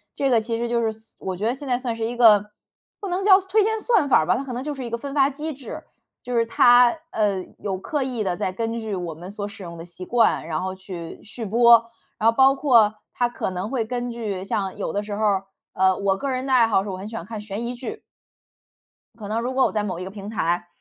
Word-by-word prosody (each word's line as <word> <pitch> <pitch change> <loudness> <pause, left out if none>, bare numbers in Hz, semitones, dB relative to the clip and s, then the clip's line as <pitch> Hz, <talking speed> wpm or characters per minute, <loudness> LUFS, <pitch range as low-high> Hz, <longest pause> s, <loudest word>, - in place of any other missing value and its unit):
这 275 -1 +1
个 230 -3 +4
其 230 0 -3
实 235 0 -2
就 235 0 +1
是 220 - +1
所 220 +1 -18
我 185 -2 -4
觉 210 - -3
得 240 +3 +1
现 280 0 -9
在 245 -1 +1
算 240 -3 -3
是 225 -1 -2
一 240 +1 -4
个 210 -3 +6 0.5
不 400 - -5
能 370 +2 -1
叫 390 -1 +7
算 380 0 -11
推 430 -1 +5
荐 445 +1 0
算 380 - +2
法 - - +6
儿 155 - 0
吧， 185 - +3
它 275 - -3
可 265 - -7
能 245 - -3
就 295 0 -4
是 265 - -6
一 - - -5
个 235 - -2
分 275 +3 -7
发 275 -1 +4
机 305 +2 -5
制。 270 -1 -9 0.4
就 245 -1 -2
是 230 - +3
它， 245 +1 +6 0.2
呃， 200 -4 0
有 190 -2 -4
刻 285 +6 -2
意 245 -5 -2
地 180 -2 -1
在 185 - -1
根 230 +3 -3
据 220 -2 -4
我 170 -3 -5
们 180 +4 -9
所 205 0 -5
使 205 -1 -10
用 170 -1 -8
的 165 - -8
习 180 +1 -10
惯， 230 -8 +2
然 160 +1 -2
后 190 0 -3
去 180 -3 -8
续 225 +2 -8
播， 235 +2 +6 0.4
然 225 +1 +4
后 230 - -1
包 270 0 +7
括 240 -7 +4 0.2
它 245 - +1
可 240 - -3
能 185 +5 -4
会 245 -4 0
根 245 +1 -3
据 210 -5 -4
像 195 -1 -2
有 - - -3
的 205 - 0
时 205 -1 -5
候 215 - 0
儿， 195 -2 +1 0.3
呃， 190 0 +3
我 195 -1 +1
个 275 - -3
人 255 0 -2
的 265 - 0
爱 235 -3 +6
好 195 -3 +2
是 205 - -6
我 185 - -4
很 195 +3 -7
喜 225 - -8
欢 170 - -5
看 215 0 -6
悬 210 +2 -5
疑 245 - -3
剧。 265 - -7 1.2
可 205 -3 -8
能 225 +2 -1
如 250 +2 -2
果 265 0 +3
我 - - 0
在 210 -1 -1
某 185 -4 -3
一 185 - -5
个 190 - -7
平 200 0 -8
台， 175 -4 -1
225 Hz, 300 characters per minute, -23 LUFS, 195-250 Hz, 1.2 s, 叫